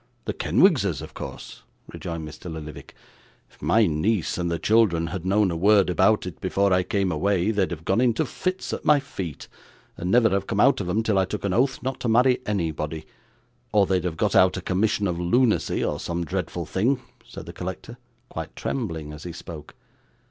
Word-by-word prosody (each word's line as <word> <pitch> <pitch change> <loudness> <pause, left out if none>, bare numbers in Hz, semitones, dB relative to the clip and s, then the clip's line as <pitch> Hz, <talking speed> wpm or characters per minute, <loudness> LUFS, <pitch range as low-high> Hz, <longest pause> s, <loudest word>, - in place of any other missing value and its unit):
'The - - -2
Kenwigses - - +2
of - - -10
course,' - - -8 0.3
rejoined 85 -2 -5
Mr. 80 +3 -9
Lillyvick. 75 -1 -9 0.6
'If - - -25
my 105 +10 +4
niece 90 +3 0
and 85 -1 -1
the 85 - -1
children 105 -5 +3
had 95 -1 -4
known 100 -1 +3
a - - -2
word 100 +1 +4
about 95 +4 +3
it 90 -4 -8
before 100 +1 +1
I 90 - +4
came 95 0 0
away, 95 +5 +1
they'd 100 -4 +1
have 80 -2 -7
gone 115 - +2
into 120 -3 +2
fits 185 0 -3
at - - -4
my 150 -1 +5
feet, 95 - -7 0.5
and 90 - -3
never 115 +2 +5
have 95 0 0
come 100 - -1
out 135 0 +4
of 90 - -4
'em 110 +5 +1
till 105 -3 +2
I 95 - +3
took 100 +2 -5
an 95 - 0
oath 130 +5 +1
not 130 0 -3
to - - -3
marry 125 +3 +4
anybody 80 -5 -2 0.7
or 105 -1 +4
they'd 90 -2 0
have 85 -3 -3
got - - +1
out 95 0 +5
a - - -4
commission 105 +2 +1
of 85 -3 -1
lunacy, 110 +7 +2
or 75 - -2
some 85 +1 -3
dreadful 90 -1 -3
thing,' 115 - +1 0.2
said - - -10
the - - -9
collector, 95 +7 -7 0.3
quite 80 -8 -7
trembling 80 - -4
as 75 - -10
he 90 - -6
spoke. 80 -2 -10
95 Hz, 200 wpm, -24 LUFS, 85-110 Hz, 0.7 s, my